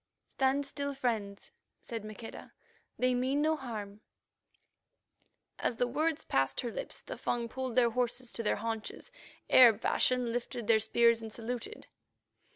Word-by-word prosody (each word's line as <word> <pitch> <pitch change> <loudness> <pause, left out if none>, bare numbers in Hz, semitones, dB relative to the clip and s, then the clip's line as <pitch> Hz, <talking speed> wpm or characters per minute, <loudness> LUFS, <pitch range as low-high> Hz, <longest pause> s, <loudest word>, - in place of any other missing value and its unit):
"Stand 270 +1 +1
still, 280 0 -4
friends," 220 -7 -2 0.3
said 230 -2 -6
Maqueda; 215 +1 -9 0.4
"they 255 0 +2
mean 260 +3 +1
no 315 +1 +3
harm." 215 -7 -7 1.6
As - - 0
the 245 - +1
words 315 +5 0
passed 135 0 +1
her 240 - -3
lips, - - -6
the - - -6
Fung 235 -1 -1
pulled 255 0 -4
the 250 -2 +5
horses 245 +1 -1
to - - -2
their 215 - +1
haunches, 225 - -5 0.4
Arab 235 -4 +8
fashion, 250 -2 +2
lifted 235 -2 -1
spears 230 +1 +4
and 220 -1 -7
saluted. 245 - -5
240 Hz, 140 wpm, -32 LUFS, 225-260 Hz, 1.6 s, Arab